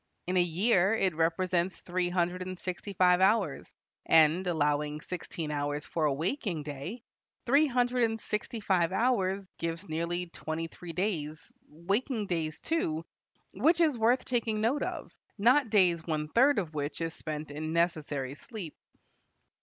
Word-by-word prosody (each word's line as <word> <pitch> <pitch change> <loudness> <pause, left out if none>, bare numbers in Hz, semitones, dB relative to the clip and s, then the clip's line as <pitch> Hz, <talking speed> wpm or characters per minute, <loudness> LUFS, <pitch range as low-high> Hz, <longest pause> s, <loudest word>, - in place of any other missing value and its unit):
In 180 - -2
a 180 - +5
year 190 +4 +3
it 190 -5 +1
represents 170 +2 0
three 180 0 -2
hundred 175 0 0
and 185 0 -5
sixty 185 +3 -5
five 180 0 +4
hours, 210 +4 +2 0.4
and, 165 +3 +5
allowing 150 -2 0
sixteen 165 -2 -5
hours 145 0 -2
for 160 -2 -1
a 150 - +3
waking 170 - -2
day, 150 - -6 0.4
three 280 +5 +4
hundred 245 -1 +2
and 225 0 -2
sixty 215 +2 -3
five 180 -4 +2
hours 195 -3 +1
gives 165 +3 -4
nearly 170 +3 -2
twenty 165 -1 -5
three 170 +1 -9
days, 160 -4 -3 0.2
waking 205 - -2
days, 160 -4 -2
too, 165 - -1 0.5
which 315 - +3
is 315 -5 +4
worth 235 +3 +2
taking 230 -3 0
note 235 +7 +1
of, - - -4 0.3
not 245 +4 +4
days 180 -6 +3
one 155 -2 -2
third 265 - +4
of 170 -6 -2
which 145 0 -3
is 165 -1 -2
spent 155 -2 -6
in 155 +2 -4
necessary 155 -5 0
sleep. 185 - -8
180 Hz, 155 wpm, -30 LUFS, 160-215 Hz, 0.5 s, a